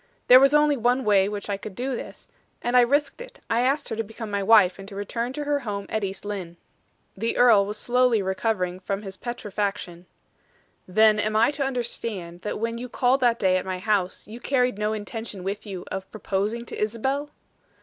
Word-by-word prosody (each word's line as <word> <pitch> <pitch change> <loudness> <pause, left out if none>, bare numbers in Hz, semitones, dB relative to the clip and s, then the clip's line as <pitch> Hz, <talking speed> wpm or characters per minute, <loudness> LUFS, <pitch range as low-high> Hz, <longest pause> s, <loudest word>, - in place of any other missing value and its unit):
There 250 +1 +10
was 275 +2 +5
only 295 -1 +4
one 245 +2 +1
way 200 -2 +4
which 205 -1 -5
I 200 -1 -2
could 200 -1 -9
do 255 +3 -2
this, - - -9 0.4
and 240 +1 0
I 250 - +8
risked 285 - +1
it. - - -11
I 230 +1 +3
asked 275 +3 0
her - - -3
to 225 - -2
become 225 0 -8
my 200 0 0
wife, 195 -3 +5
and 195 - -9
to 200 - -9
return 230 +5 -3
to 295 - -4
her 290 0 0
home 205 -6 -4
at 220 -1 -2
East 195 +1 -5
Lynne." 185 -5 -5 0.6
The 225 +4 -2
earl 220 -5 +6
was 210 +1 -3
slowly 250 0 +2
recovering 190 -1 -1
from 195 +2 -4
his 195 -2 -7
petrifaction. 200 -6 -4 0.8
"Then, 215 +3 +4
am 215 +1 0
I 225 +5 +4
to 290 -1 -2
understand, 230 -9 -4
that 210 - -3
when 230 +1 -3
you 250 +1 -6
called 250 +3 +2
that 240 -3 +3
day 185 -2 +2
at 185 - -2
my 185 -1 -2
house, 190 -2 -1
you 225 +3 -9
carried 250 -5 0
no 210 0 0
intention 215 -2 -6
with 200 +3 -4
you 190 -3 -6
of 190 0 -5
proposing 215 +3 -2
to - - -7
Isabel?" 265 +7 -1
215 Hz, 210 wpm, -25 LUFS, 195-245 Hz, 0.8 s, There